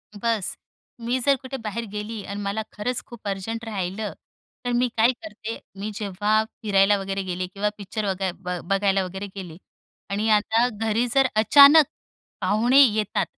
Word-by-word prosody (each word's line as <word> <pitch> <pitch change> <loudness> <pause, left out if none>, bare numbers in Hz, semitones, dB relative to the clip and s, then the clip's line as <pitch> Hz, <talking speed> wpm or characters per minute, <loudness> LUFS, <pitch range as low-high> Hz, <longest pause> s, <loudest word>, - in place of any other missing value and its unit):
बस, 220 -2 -1 0.4
मी 240 +3 -1
जर 275 +2 +3
कुठे 270 +1 -6
बाहेर 225 +2 -4
गेली 210 +1 -5
आणि 200 0 -5
मला 200 +2 -2
खरंच 240 +4 -3
खूप 235 -3 -11
अर्जंट 200 +4 -4
राहिलं, 205 0 -4 0.5
तर 245 - 0
मी 245 +1 +2
काय 230 +3 +5
करते, 230 -5 -8 0.2
मी 210 +2 -4
जेव्हा 210 +2 +1 0.2
फिरायला 200 -1 +4
वगैरे 195 0 -3
गेले 180 0 -3
किंवा 200 +3 -2
पिक्चर 210 +1 -4
वगै 190 -1 -1
ब 180 -1 -5
बघायला 195 -1 +2
वगैरे 190 +2 -6
गेले 175 -4 -8 0.5
आणि 215 +2 0
आता 225 +3 +1
घरी 225 +1 0
जर 270 -1 +5 0.2
अचानक 290 +4 +8 0.6
पाहुणे 225 +8 +3
येतात 215 -5 +2
210 Hz, 155 wpm, -24 LUFS, 195-230 Hz, 0.6 s, अचानक